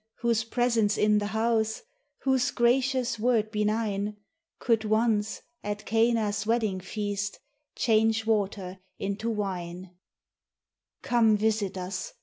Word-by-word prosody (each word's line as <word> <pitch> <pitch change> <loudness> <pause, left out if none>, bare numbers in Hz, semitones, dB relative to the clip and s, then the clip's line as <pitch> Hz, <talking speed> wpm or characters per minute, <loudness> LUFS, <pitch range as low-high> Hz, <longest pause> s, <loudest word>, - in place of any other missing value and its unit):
whose 230 -2 +2
presence 230 -3 +1
in 210 0 +4
the 205 - -2
house, 220 - 0 0.4
Whose 265 -2 +2
gracious 250 -1 +1
word 220 -2 +1
benign, 210 -1 -1 0.4
Could 230 -3 +1
once, 215 0 +1 0.2
at 205 0 -4
Cana's 225 -2 +1
wedding 220 -5 +1
feast, 205 +1 -3 0.4
Change 225 -1 +2
water 200 -4 -1 0.2
into 200 +3 -3
wine; 185 -4 -4 1.1
Come, 225 -3 +4
visit 210 -2 0
us! 185 0 -5
215 Hz, 110 wpm, -27 LUFS, 205-230 Hz, 1.1 s, in